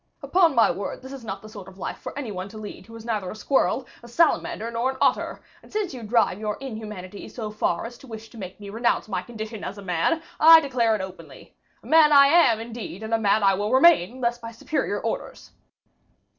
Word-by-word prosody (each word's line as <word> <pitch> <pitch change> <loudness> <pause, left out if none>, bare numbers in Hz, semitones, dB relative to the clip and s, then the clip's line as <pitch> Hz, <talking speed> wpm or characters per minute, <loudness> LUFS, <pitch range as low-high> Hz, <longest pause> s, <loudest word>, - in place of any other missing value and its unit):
Upon 340 -6 +3
my 230 - +5
word, 200 +5 -5
this 260 +1 -9
is 270 -3 -9
not 220 - -6
the - - -10
sort 205 -4 -10
of 190 0 -13
life - - -5
for - - -8
any 260 -7 -4
one 185 0 -6
to 215 - -11
lead 215 +1 -9
who 230 - -12
is 225 0 -10
neither 210 -5 -2
a - - -7
squirrel, 265 +3 +1 0.2
a 235 - -13
salamander, 235 -4 +1
nor 235 +3 0
an 265 - -5
otter; - - +1 0.2
and - - -19
since 420 -6 -2
you 250 - -7
drive 220 -3 +1
your 210 -1 -3
inhumanity 210 -7 -8
so 220 -3 -6
far 210 -4 -1
as 240 +1 -9
to 270 - -14
wish 225 -1 -9
to 230 - -12
make 185 0 -8
me 200 -1 -9
renounce 235 +1 0
my 190 -4 -2
condition 220 0 -7
as 200 - -6
a 200 - -9
man, 190 - 0 0.2
I 325 +1 +9
declare 250 -7 +1
it 210 - -3
openly. 190 0 -11 0.3
A - - -18
man 315 -1 +6
I 280 -1 +8
am, 285 -9 +5
indeed, 225 -3 -7
and 220 +1 -4
a 225 - +3
man 210 0 +2
I 195 0 +5
will 205 +3 -2
remain, 260 - +5
unless 240 -2 -2
by 230 -1 -7
superior 230 -3 -2
orders." 225 - -5
225 Hz, 235 wpm, -24 LUFS, 205-260 Hz, 0.3 s, I